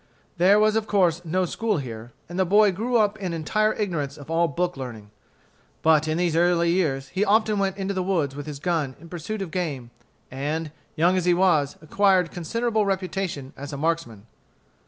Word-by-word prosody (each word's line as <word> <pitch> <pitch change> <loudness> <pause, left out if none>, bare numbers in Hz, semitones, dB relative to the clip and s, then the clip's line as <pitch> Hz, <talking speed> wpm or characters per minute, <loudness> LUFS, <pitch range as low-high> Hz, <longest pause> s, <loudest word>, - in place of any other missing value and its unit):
There 190 +4 +6
was 215 0 +3
of 220 -1 0
course 180 -4 +2
no 180 +3 0
school 215 +4 -1
here, 120 -4 -7 0.2
and 175 +2 -5
the - - +5
boy 205 +3 +5
grew 235 +6 0
up 210 -2 +1
in 185 -4 -3
entire 215 +7 +1
ignorance 160 -9 -2
of 145 +2 -10
all 170 +1 +3
book 175 +3 -2
learning. 115 -6 -8 0.7
But 160 -1 +4
in 155 +1 0
these 175 -2 +1
early 170 0 +3
years 140 -7 0
he 195 - 0
often 215 0 +2
went 195 -1 0
into 195 0 -2
the 190 - -1
woods 165 -8 0
with 145 +1 -7
his 150 -2 -5
gun 150 -4 -1
in 165 +2 -13
pursuit 190 +5 -4
of 175 - -8
game, 145 -10 -3 0.4
and, 150 +4 -3 0.2
young 175 +4 +3
as 180 - 0
he 175 -1 +4
was, 170 -6 +2
acquired 185 +1 +2
considerable 220 +5 -1
reputation 185 -7 -3
as 145 +1 -8
a - - -4
marksman. 145 -9 -2
175 Hz, 195 wpm, -24 LUFS, 150-195 Hz, 0.7 s, There